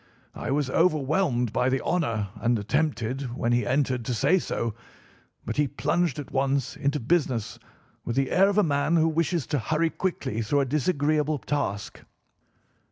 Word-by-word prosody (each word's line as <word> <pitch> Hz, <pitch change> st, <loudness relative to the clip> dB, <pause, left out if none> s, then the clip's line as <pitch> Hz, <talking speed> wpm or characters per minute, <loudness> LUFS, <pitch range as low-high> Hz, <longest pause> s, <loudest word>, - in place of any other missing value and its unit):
I -, -, -5 dB
was 145 Hz, 0 st, +1 dB
overwhelmed 150 Hz, -, +1 dB
by 125 Hz, -, +2 dB
the 135 Hz, +1 st, +1 dB
honour 115 Hz, -, -1 dB
and 115 Hz, +2 st, +1 dB
attempted, 130 Hz, +1 st, -1 dB
when 120 Hz, -, 0 dB
he 120 Hz, 0 st, +1 dB
entered, 130 Hz, -2 st, +1 dB
to 125 Hz, -, -1 dB
say 185 Hz, +11 st, +3 dB
so, 115 Hz, -8 st, -2 dB, 0.7 s
but 110 Hz, -, -4 dB
he 150 Hz, -1 st, +3 dB
plunged 165 Hz, +5 st, 0 dB
at 145 Hz, -, -7 dB
once 135 Hz, -1 st, 0 dB
into 145 Hz, -1 st, -1 dB
business 130 Hz, -5 st, 0 dB, 0.4 s
with 120 Hz, -, -3 dB
the 135 Hz, -1 st, +1 dB
air 195 Hz, +2 st, +5 dB
of 200 Hz, -, -1 dB
a 210 Hz, -, +5 dB
man 145 Hz, +1 st, +1 dB
who 160 Hz, -1 st, +4 dB
wishes 165 Hz, -1 st, 0 dB
to 145 Hz, -2 st, -1 dB
hurry 160 Hz, +6 st, 0 dB
quickly 135 Hz, -, -2 dB
through 140 Hz, +6 st, +1 dB
a -, -, +1 dB
disagreeable 150 Hz, +1 st, +1 dB
task. 115 Hz, -9 st, -3 dB
140 Hz, 165 wpm, -26 LUFS, 120-155 Hz, 0.7 s, air